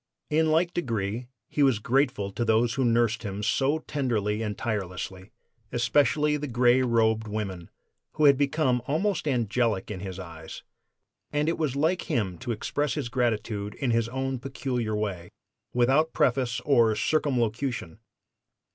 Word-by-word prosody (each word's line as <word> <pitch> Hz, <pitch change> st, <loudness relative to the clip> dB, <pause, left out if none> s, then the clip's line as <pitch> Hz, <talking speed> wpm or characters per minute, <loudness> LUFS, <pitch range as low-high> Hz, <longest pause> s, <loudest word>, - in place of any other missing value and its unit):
In 160 Hz, +1 st, +3 dB
like 170 Hz, +3 st, +2 dB
degree 115 Hz, -, -2 dB, 0.2 s
he 150 Hz, -, -2 dB
was 135 Hz, -5 st, +4 dB
grateful 120 Hz, -3 st, 0 dB
to 120 Hz, -, -2 dB
those 115 Hz, +1 st, +2 dB
who 135 Hz, -, 0 dB
nursed 120 Hz, -1 st, +2 dB
him 100 Hz, -2 st, -5 dB
so 135 Hz, +6 st, +2 dB
tenderly 115 Hz, -9 st, -1 dB
and 105 Hz, -2 st, -3 dB
tirelessly, 95 Hz, -3 st, -4 dB, 0.4 s
especially 145 Hz, +4 st, +2 dB
the 150 Hz, 0 st, -4 dB
gray 125 Hz, 0 st, +4 dB
robed 110 Hz, -3 st, +2 dB
woman, 100 Hz, -5 st, -4 dB, 0.4 s
who 155 Hz, -, +2 dB
had 140 Hz, -1 st, +8 dB
become 140 Hz, -2 st, +1 dB
almost 170 Hz, +3 st, 0 dB
angelic 115 Hz, -5 st, 0 dB
in 100 Hz, -, -5 dB
his 95 Hz, -1 st, -6 dB
eyes; 80 Hz, -4 st, -9 dB, 0.7 s
and 150 Hz, +1 st, 0 dB
it 165 Hz, 0 st, 0 dB
was 150 Hz, -5 st, 0 dB
like 160 Hz, +6 st, 0 dB
him 95 Hz, -7 st, -1 dB
to 120 Hz, -, -4 dB
express 145 Hz, +6 st, -1 dB
his 140 Hz, -6 st, -3 dB
gratitude 110 Hz, -4 st, -1 dB
in 130 Hz, -4 st, -1 dB
his 115 Hz, 0 st, +1 dB
own 130 Hz, +1 st, -2 dB
peculiar 125 Hz, -4 st, -3 dB
way, 100 Hz, -5 st, -3 dB, 0.4 s
without 135 Hz, +6 st, +2 dB
preface 125 Hz, -2 st, +1 dB
or 115 Hz, -5 st, +3 dB
circumlocution. 120 Hz, -, -1 dB
120 Hz, 145 wpm, -27 LUFS, 105-140 Hz, 0.7 s, had